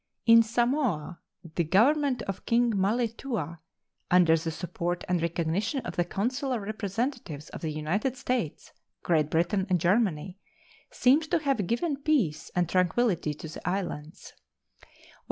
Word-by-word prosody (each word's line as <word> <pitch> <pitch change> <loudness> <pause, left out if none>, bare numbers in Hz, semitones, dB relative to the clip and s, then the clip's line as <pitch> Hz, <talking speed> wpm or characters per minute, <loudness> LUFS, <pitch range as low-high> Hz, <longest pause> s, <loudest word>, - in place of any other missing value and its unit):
In 230 -1 +8
Samoa 230 - 0 0.3
the 170 - +1
Government 250 - +3
of 195 -1 -6
King 235 0 +3
Malietoa, 210 - -1 0.5
under 175 -2 +5
the 165 0 -2
support 175 +1 -3
and 180 -2 +1
recognition 170 - -1
of - - -6
the 175 - +2
consular 250 +8 -2
representatives 210 - -4
of - - -9
the 160 - -2
United 175 - -1
States, 245 -10 -3 0.3
Great 155 -3 +2
Britain, 175 +5 +1
and 180 -1 +2
Germany, 185 -1 +1 0.5
seems 290 +6 +3
to 340 - +2
have 275 - 0
given 280 - 0
peace 235 - +1
and 180 -1 +2
tranquillity 180 -2 +1
to 160 - -8
the 160 +2 -5
islands. 175 -5 -5
195 Hz, 135 wpm, -28 LUFS, 170-240 Hz, 0.5 s, In